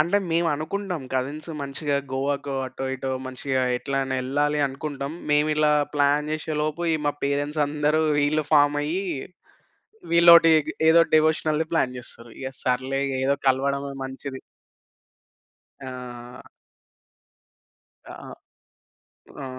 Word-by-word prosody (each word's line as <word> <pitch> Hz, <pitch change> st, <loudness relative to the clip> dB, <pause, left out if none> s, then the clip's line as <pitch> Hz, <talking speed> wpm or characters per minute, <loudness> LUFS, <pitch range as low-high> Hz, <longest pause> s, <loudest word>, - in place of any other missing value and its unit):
అంటే 175 Hz, +6 st, +3 dB
మేమనుకుంటాం 165 Hz, +2 st, -1 dB
కజిన్స్ 140 Hz, +5 st, -3 dB
మంచిగా 140 Hz, +1 st, -2 dB, 0.2 s
గోవా‌కో 140 Hz, +1 st, -2 dB
అటో 130 Hz, +1 st, -6 dB
ఇటో 135 Hz, 0 st, -4 dB, 0.2 s
మంచిగా 130 Hz, 0 st, -2 dB, 0.2 s
ఎట్లైనా 135 Hz, 0 st, -2 dB
యెళ్ళాలి 145 Hz, +3 st, 0 dB
అనుకుంటాం. 140 Hz, +1 st, -5 dB, 0.2 s
మేమిలా 150 Hz, 0 st, +3 dB, 0.2 s
ప్లాన్ 145 Hz, +1 st, +2 dB
జేసే‌లోపు 155 Hz, +1 st, -2 dB
ఈ -, -, +2 dB
మా 145 Hz, -, +2 dB
పేరెంట్సందరూ 150 Hz, +2 st, 0 dB, 0.2 s
ఈళ్ళు 155 Hz, +1 st, 0 dB
ఫార్మయ్యి 145 Hz, +5 st, +2 dB, 1.1 s
వీళ్లొటి 170 Hz, -1 st, +8 dB, 0.4 s
ఏదో 165 Hz, +1 st, +7 dB
డివోషనల్‌ది 155 Hz, 0 st, +2 dB
ప్లాన్ 125 Hz, -5 st, +1 dB
జేస్తారు. 120 Hz, -1 st, -10 dB
ఇగ 130 Hz, -, -4 dB
సర్లే 130 Hz, +2 st, 0 dB
ఇగ 135 Hz, -, -3 dB
ఏదో 140 Hz, +1 st, +2 dB
కలవడమే 140 Hz, +1 st, 0 dB
మంచిది. 135 Hz, 0 st, -7 dB, 1.4 s
ఆ! 125 Hz, -1 st, -9 dB, 1.7 s
ఆ! -, -, -9 dB, 1.3 s
ఆ! -, -, -5 dB
145 Hz, 100 wpm, -24 LUFS, 135-155 Hz, 1.7 s, వీళ్లొటి